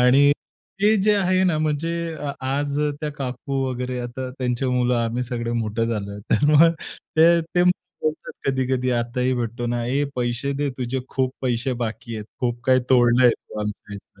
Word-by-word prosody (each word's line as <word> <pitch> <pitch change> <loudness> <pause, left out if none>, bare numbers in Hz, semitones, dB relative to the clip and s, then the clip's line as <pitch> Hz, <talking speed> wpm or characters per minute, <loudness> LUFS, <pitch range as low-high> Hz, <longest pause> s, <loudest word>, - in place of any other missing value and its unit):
आणि 135 +3 +6 0.5
ते 215 +1 +5
जे 210 +1 +4
आहे 185 -1 +2
ना, 170 -4 +2
म्हणजे 155 +2 0 0.2
अ, 145 -1 -4
आज 140 +2 -1 0.2
त्या 150 -1 -2
काकू 135 0 -3
वगैरे 125 0 -3
आता 125 +1 -5
त्यांचे 125 0 -1
मुलं 125 -1 +2
आम्ही 115 +2 -1
सगळे 120 -1 -3
मोठे 110 +1 -1
झालो 105 -3 -3
आहेत. 105 - -8
तर 110 - +3
मग 165 +3 +7 0.5
ते, 170 +1 +6
ते 175 +2 0
बोलतात 155 -3 -2
कधी-कधी 130 -1 0
आताही 125 +2 0
भेटतो 120 0 -3
ना. 120 0 -1
ए, 140 +4 +1
पैसे 120 +3 -1
दे 140 0 -1
तुझे 130 +1 -2
खूप 130 -1 -1
पैसे 125 +1 0
बाकी 115 +1 -6
आहेत. 105 - -6 0.2
खूप 120 -1 -1
काही 130 0 +4
तोडलं 120 0 +5
आहे 120 - +7 0.2
तू 105 - -6
आमच्या 105 0 -5
इथलं. 100 - -13
130 Hz, 180 wpm, -23 LUFS, 120-145 Hz, 0.5 s, मग